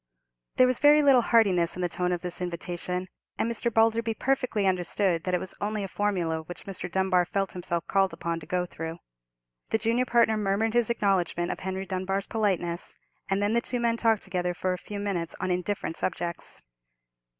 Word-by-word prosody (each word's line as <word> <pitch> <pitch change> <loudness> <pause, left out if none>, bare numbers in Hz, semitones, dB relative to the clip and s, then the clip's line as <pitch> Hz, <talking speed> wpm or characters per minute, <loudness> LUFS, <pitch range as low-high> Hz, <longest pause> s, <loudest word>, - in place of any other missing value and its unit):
There 255 - +6
was 255 -1 +1
very 295 +1 +6
little 270 -3 +6
heartiness 195 -8 +3
in 180 - -3
the - - +2
tone 180 +1 -1
of 175 -1 -1
this 180 0 -4
invitation; 180 +1 -3 0.3
and - - +1
Mr. 235 0 -1
Balderby 225 0 +2
perfectly 255 -6 0
understood 180 -1 +1
that 185 -1 +1
it - - 0
was 190 - -6
only 210 0 -1
a - - -3
formula 180 -6 -1
which 165 +2 -10
Mr. 180 -3 -6
Dunbar 190 -1 +3
felt 195 +2 -1
himself 175 -1 -3
called 195 -1 +2
upon 170 0 -3
to 155 - -12
go 180 -1 0
through. 165 -1 -6 0.7
The - - +2
junior 230 +3 +1
partner 235 -3 +3
murmured 210 +2 0
his 240 -2 +3
acknowledgment 190 -6 +1
of - - -5
Henry 190 +1 -4
Dunbar's 195 +1 -2
politeness; 185 -6 -1 0.3
and 195 +1 +1
then 205 +2 +2
the 235 - +3
two 245 0 -2
men 235 -1 +2
talked 225 -2 +2
together 180 -2 -2
for 185 +1 -1
a - - -3
few 205 - -7
minutes 185 -5 -2
on 185 - -1
indifferent 180 -1 -2
subjects. 170 -2 -4
195 Hz, 195 wpm, -27 LUFS, 180-220 Hz, 0.7 s, There